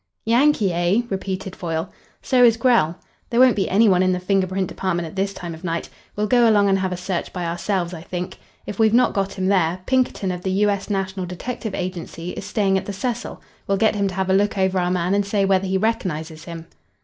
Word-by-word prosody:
"Yankee, 235 -5 +3
eh?" 175 +6 +2
repeated 190 -1 -4
Foyle. 165 0 -3 0.3
"So 255 -2 +3
is 230 -2 +6
Grell. 230 -9 +3 0.3
There 235 - +1
won't 255 -1 +6
be 195 - 0
any 215 +4 +4
one 185 -2 +4
in 185 0 +3
the 180 - -1
finger 190 +1 +1
print 185 0 -1
department 175 -2 -2
at 160 - -11
this 195 +1 0
time 175 -3 -7
of 160 +2 -11
night. 170 -1 -3 0.3
We'll 210 - 0
go 240 +1 +4
along 205 -2 +4
and 195 0 +3
have 190 0 -1
a 180 - -3
search 180 0 -3
by 180 -2 -4
ourselves, 175 +1 -2
I 165 - -7
think. 180 +2 -6 0.3
If 205 - -7
we've 220 0 +4
not 250 0 +4
got 195 -1 -1
him 190 -1 -3
there, 185 -2 +1
Pinkerton 255 -7 0
of 180 -1 -5
the 190 - -2
U. 205 +2 +2
S. 200 +1 -4
National 190 -2 -2
Detective 220 +4 -5
Agency 180 -1 -5
is - - -7
staying 195 -3 +1
at - - -11
the 200 - -3
Cecil. 240 +4 -4 0.2
We'll 195 - +1
get 220 +2 +3
him 200 -2 0
to 190 - -5
have 190 0 0
a - - +4
look 205 +2 +2
over 190 -1 +1
our 180 0 0
man 180 +1 0
and 200 0 +2
say 200 0 0
whether 190 0 +2
he 190 +1 +1
recognises 165 -7 -2
him." 165 -1 -8
190 Hz, 240 wpm, -22 LUFS, 180-205 Hz, 0.3 s, is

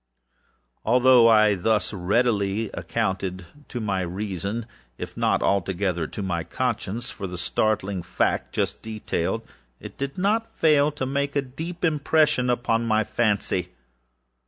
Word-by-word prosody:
Although 125 0 +6
I 110 -2 +6
thus 105 +3 0
readily 100 +1 +1
accounted 95 -1 -2 0.2
to 120 - -5
my 100 -4 -1
reason, 100 +4 -3 0.3
if - - -7
not - - +1
altogether 95 -3 0
to 100 - -6
my 85 -3 -1
conscience, 120 +10 -3
for 100 -3 -6
the 90 0 -6
startling 100 0 0
fact 85 - -1
just - - -1
detailed, 110 -1 -2 0.4
it - - -11
did 140 0 -3
not 210 +4 +2
the - - -30
less - - -34
fail 150 -2 +4
to 140 -3 -3
make 140 +1 -1
a 140 - +2
deep 160 +7 -5
impression 150 -4 +2
upon 115 -1 +1
my 110 -1 +3
fancy. 100 -6 0
110 Hz, 140 wpm, -24 LUFS, 95-130 Hz, 0.4 s, Although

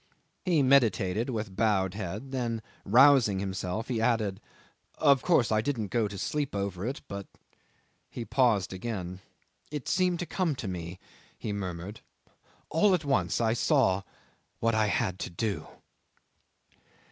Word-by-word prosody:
He 170 -6 +3
meditated 115 -5 +3
with 110 -5 -4
bowed 95 -4 +2
head, 105 +6 -5
then 120 -4 -2 0.2
rousing 125 -2 +6
himself 95 +2 -3
he 120 -4 -1
added 110 -5 +1 0.6
'"Of 140 -4 +4
course 150 -11 +3
I 110 0 +3
didn't 110 -5 -2
go 110 +1 +1
to 100 -1 -8
sleep 145 +4 -2
over 100 0 -2
it, 135 +3 -4
but.. 100 -1 -6 0.5
." - - -38 0.3
He 120 - -6
paused 110 -9 +2
again. 95 -3 -5 0.5
"It 150 -3 -5
seemed 180 -1 +2
to 175 - -3
come 175 -4 -1
to 120 - -5
me," 90 -1 -5 0.4
he 105 - -4
murmured. 95 +1 -5 0.7
"All 185 +5 +4
at 165 -4 -4
once 140 -2 +1
I 115 -1 +2
saw 95 -4 +2 0.6
what 115 0 +1
I 110 -1 +2
had 100 -3 0
to - - -4
do 100 +4 -3
110 Hz, 145 wpm, -29 LUFS, 95-130 Hz, 0.7 s, rousing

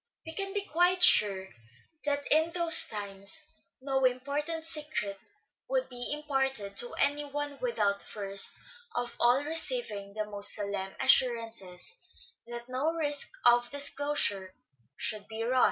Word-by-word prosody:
We 320 - -7
can 390 +2 -4
be 405 0 -3
quite 360 +1 +2
sure 190 - +6 0.6
that 285 -1 -1
in 315 +2 +5
those 335 -1 +5
times 200 +8 +1 0.3
no 265 0 -2
important 285 +6 -2
secret 295 -11 -4 0.5
would - - -1
be 245 0 -4
imparted 270 -8 -2
to 240 - 0
any 290 +1 +1
one 290 0 -6
without 210 -5 -1
first 200 -1 +1 0.3
of 245 0 -3
all 245 +4 +3
receiving 305 - -3
the 215 0 -4
most 205 -1 +4
solemn 200 -2 -3
assur 260 -2 +4
ances 195 -6 -5 0.5
that 240 0 -7
no 260 +5 -2
risk 290 -3 0 0.2
of 240 0 +4
disclosure 285 -9 -1 0.4
should 210 -2 -4
be 225 0 -6
run. 255 +2 0
255 Hz, 135 wpm, -29 LUFS, 210-295 Hz, 0.6 s, sure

